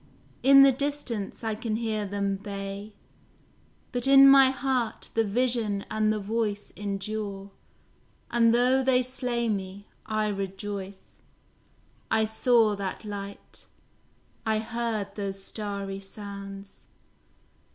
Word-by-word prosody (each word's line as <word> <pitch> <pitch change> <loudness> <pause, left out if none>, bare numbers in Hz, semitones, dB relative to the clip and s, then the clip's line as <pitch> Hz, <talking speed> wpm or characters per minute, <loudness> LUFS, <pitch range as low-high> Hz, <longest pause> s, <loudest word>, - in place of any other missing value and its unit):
in 275 +2 +8
the 275 - +7
distance 260 -7 -3
I 220 -1 -1
can 215 0 -3
hear 220 -2 -2
them 200 0 -1
bay! 200 +1 -7 1.0
But 245 +1 0
in 275 0 +9
my 270 -1 +8
heart 260 -3 -2
the 225 - +2
vision 220 -2 0
and 215 0 +2
the 215 - 0
voice 210 0 -2
Endure; 200 0 -4 0.8
and 230 -1 +4
though 250 +3 +3
they 255 -1 +3
slay 245 -2 -2
me, 200 -1 -3 0.2
I 215 -1 0
rejoice 195 0 -6 0.9
I 220 0 +3
saw 220 -1 +3
that 195 +2 -5
light, 200 -1 -8 0.8
I 220 -1 +1
heard 220 -2 -3
those 195 -1 -5
starry 200 -2 -4
sounds. 195 0 -10
215 Hz, 115 wpm, -27 LUFS, 200-235 Hz, 1.0 s, in